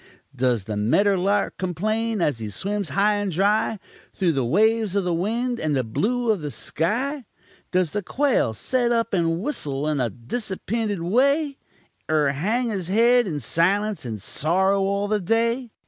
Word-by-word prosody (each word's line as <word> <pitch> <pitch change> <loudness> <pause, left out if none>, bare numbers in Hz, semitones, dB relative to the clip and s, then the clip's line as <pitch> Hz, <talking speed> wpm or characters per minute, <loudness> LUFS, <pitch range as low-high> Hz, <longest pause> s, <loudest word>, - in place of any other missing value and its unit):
Does 125 -4 +1
the 105 +2 -4
medder 195 - +3
lark 195 +2 0
complane, 215 +4 -1
as 140 -6 0
he 110 -2 -5
swims 200 - -3
high 205 +8 +2
and 205 -2 -2
dry 205 +5 +1 0.4
Through 180 -4 +1
the 135 -3 0
waves 215 - +2
of 200 - +2
the 180 -1 0
wind 230 +8 -1
and 155 -2 0
the 130 - +1
blue 230 - 0
of 205 -6 -1
the 150 - -4
sky? 235 - -2 0.5
Does 180 -4 +1
the 210 - -2
quail 260 - +1
set 245 - 0
up 230 -2 0
and 165 -2 +1
whissel 145 - -2
in 150 -2 0
a 125 -2 +1
disappinted 200 - -3
way, 275 - +2 0.5
Er 155 -2 +3
hang 220 - 0
his 190 -6 -3
head 235 +4 +4
in 165 - -3
silunce, 195 - 0
and 110 -4 -5
sorrow 190 - +1
all 200 +1 0
the 210 0 +1
day? 230 +5 0
200 Hz, 170 wpm, -23 LUFS, 155-225 Hz, 0.5 s, head